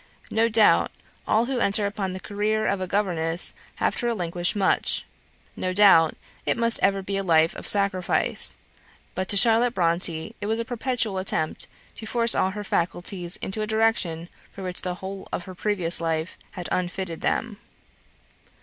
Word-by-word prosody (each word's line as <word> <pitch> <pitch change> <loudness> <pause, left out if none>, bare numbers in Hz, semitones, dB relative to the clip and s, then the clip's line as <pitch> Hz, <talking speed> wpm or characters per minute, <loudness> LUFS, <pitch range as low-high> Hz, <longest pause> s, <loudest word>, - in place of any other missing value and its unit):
No 225 +1 +2
doubt, 220 -1 +4 0.4
all 225 +2 +2
who 255 0 -2
enter 205 -1 +3
upon 200 -2 -3
the 185 - -6
career 215 +2 -1
of 200 -2 0
a 185 - -2
governess 175 -4 -1 0.2
have - - 0
to 240 - -1
relinquish 175 -5 -1
much; 200 -2 +1 0.5
no 185 0 -2
doubt, 185 -5 +6 0.3
it - - 0
must 230 -1 +5
ever 195 0 +2
be 195 +1 -2
a 195 - 0
life 165 -2 +3
of - - -8
sacrifice; 195 -3 +3 0.6
but 185 0 -3
to 200 - +3
Charlotte 235 +3 +4
Bronte 170 +3 0
it 205 - -3
was 220 +1 0
a 230 - -3
perpetual 235 -4 -1
attempt 160 -4 -2 0.3
to 220 - -8
force 230 0 +3
all 190 - +1
her 205 +2 -6
faculties 175 0 -2
into 205 +3 -3
a 215 - -2
direction 220 -7 0 0.2
for 195 - -9
which 180 -1 -2
the 180 -1 -3
whole 190 +1 -8
of - - -4
her 185 - -9
previous 180 -3 -1
life 165 0 -2 0.2
had 180 - -5
unfitted 180 -2 -3
them. 225 -3 -1
195 Hz, 170 wpm, -24 LUFS, 175-220 Hz, 0.6 s, doubt